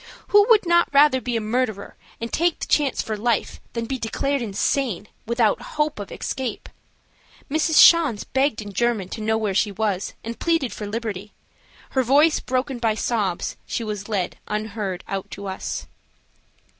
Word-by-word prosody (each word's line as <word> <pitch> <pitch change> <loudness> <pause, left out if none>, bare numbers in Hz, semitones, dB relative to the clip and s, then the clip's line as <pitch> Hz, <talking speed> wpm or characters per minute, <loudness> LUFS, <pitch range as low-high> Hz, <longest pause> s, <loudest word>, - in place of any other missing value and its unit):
Who 410 0 +6
would 435 -4 +6
not 345 0 +4
rather 280 -2 +5
be 245 0 -1
a - - -2
murderer 220 -2 -2 0.2
and 230 0 -5
take 340 0 +2
the - - -3
chance 290 -3 +1
for 220 - -3
life 225 +1 -1
than 230 -1 -2
be 265 +2 -3
declared 275 +5 -1
insane, 215 0 -1 0.2
without 235 -2 +2 0.2
hope 300 -5 0
of 205 - -7
escape? 260 -5 -4 0.8
Mrs. 315 +1 +1
Schanz 310 -11 +7
begged 265 -4 0
in 205 -1 -9
German 230 -4 0
to 220 - -6
know 220 +1 +1
where 215 -3 -1
she 205 +2 +1
was, 200 -2 -2
and 230 +1 -6
pleaded 325 -10 +1
for 210 - -6
liberty. 210 -2 -5 0.6
Her 265 - +2
voice 290 +6 +4
broken 255 0 -2
by 225 -2 +1
sobs, 210 -6 -1
she 235 - -2
was 210 -1 -5
led 195 -5 -2
unheard 210 -3 -3
out 195 -1 -4
to 200 - -8
us. 190 -1 -4
230 Hz, 170 wpm, -23 LUFS, 210-275 Hz, 0.8 s, Schanz